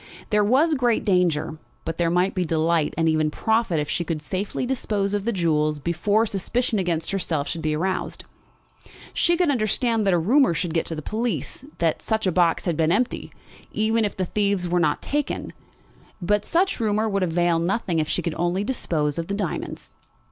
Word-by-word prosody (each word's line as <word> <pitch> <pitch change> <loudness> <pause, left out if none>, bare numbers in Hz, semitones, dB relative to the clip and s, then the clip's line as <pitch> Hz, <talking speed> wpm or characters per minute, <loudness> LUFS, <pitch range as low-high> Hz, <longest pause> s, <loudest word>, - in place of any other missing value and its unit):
There 210 0 +4
was 275 +10 +3
great 245 -5 +1
danger, 165 -5 +1 0.3
but 165 +1 -4
there 170 -1 +2
might 180 +3 +2
be 185 - 0
delight 165 -1 +1
and 165 0 +2
even 155 -1 +2
profit 220 0 +1
if 150 - -2
she 175 - -1
could 160 -1 -3
safely 190 +10 -3
dispose 210 -6 -1
of 205 -1 -1
the 235 - +1
jewels 155 -5 +1
before 175 +8 +1
suspicion 220 +3 -1
against 170 -2 -1
herself 165 -7 -1
should 165 - -3
be 155 -1 0
aroused. 185 +4 -2 0.9
She 345 0 +2
could 350 -4 +3
understand 225 -2 +1
that 195 - +4
a - - +3
rumour 230 - +3
should 165 0 -2
get 165 - 0
to 165 - -3
the 155 - -6
police 230 - -3
that 165 -2 +1
the 220 -4 0
box 170 -1 +2
had 170 -3 0
been 160 +1 +2
empty, 235 +6 0 0.4
even 220 +1 +1
if 205 - -2
the 185 - 0
thieves 200 -1 0
were 175 +1 +1
not 155 -3 +1
taken; 290 0 -2 0.7
but 210 +3 +1
such 370 0 +1
rumour 215 -1 +1
would 200 -2 0
avail 175 -1 +2
nothing 175 -1 0
if 155 0 -1
she 180 - 0
could 170 - -2
only 175 +3 0
dispose 160 - -1
of 165 - -3
the 200 - -2
diamonds. 200 -6 -4
185 Hz, 190 wpm, -24 LUFS, 165-220 Hz, 0.9 s, There